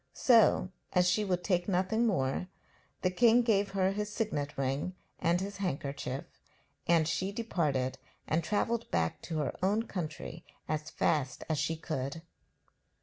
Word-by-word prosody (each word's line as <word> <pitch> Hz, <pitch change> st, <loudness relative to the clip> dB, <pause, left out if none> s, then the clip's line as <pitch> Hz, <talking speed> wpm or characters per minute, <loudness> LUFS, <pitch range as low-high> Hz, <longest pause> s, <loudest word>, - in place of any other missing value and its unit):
So, 225 Hz, -6 st, +5 dB, 0.2 s
as 180 Hz, 0 st, +4 dB
she 190 Hz, +4 st, +3 dB
would 180 Hz, -3 st, -1 dB
take 180 Hz, -2 st, +1 dB
nothing 200 Hz, +5 st, +2 dB
more, 155 Hz, -4 st, 0 dB, 0.6 s
the 185 Hz, -, +3 dB
king 235 Hz, +4 st, +5 dB
gave 205 Hz, -4 st, +2 dB
her 190 Hz, -1 st, +2 dB
his 210 Hz, +1 st, -3 dB
signet 150 Hz, -10 st, -2 dB
ring 140 Hz, +7 st, -1 dB, 0.2 s
and 170 Hz, +1 st, +2 dB
his 200 Hz, +1 st, -4 dB
handkerchief, 140 Hz, -7 st, -3 dB, 0.6 s
and 165 Hz, -2 st, +4 dB
she 185 Hz, +4 st, -1 dB
departed 150 Hz, -, -1 dB, 0.3 s
and 160 Hz, +2 st, +1 dB
travelled 230 Hz, +5 st, 0 dB
back 80 Hz, 0 st, 0 dB
to 160 Hz, -, -4 dB
her 150 Hz, -3 st, -1 dB
own 205 Hz, +4 st, +2 dB
country 165 Hz, -4 st, -5 dB, 0.2 s
as 155 Hz, 0 st, -2 dB
fast 140 Hz, -5 st, 0 dB
as 155 Hz, -3 st, 0 dB
she 165 Hz, -, 0 dB
could. 155 Hz, -1 st, -4 dB
180 Hz, 145 wpm, -31 LUFS, 155-200 Hz, 0.6 s, So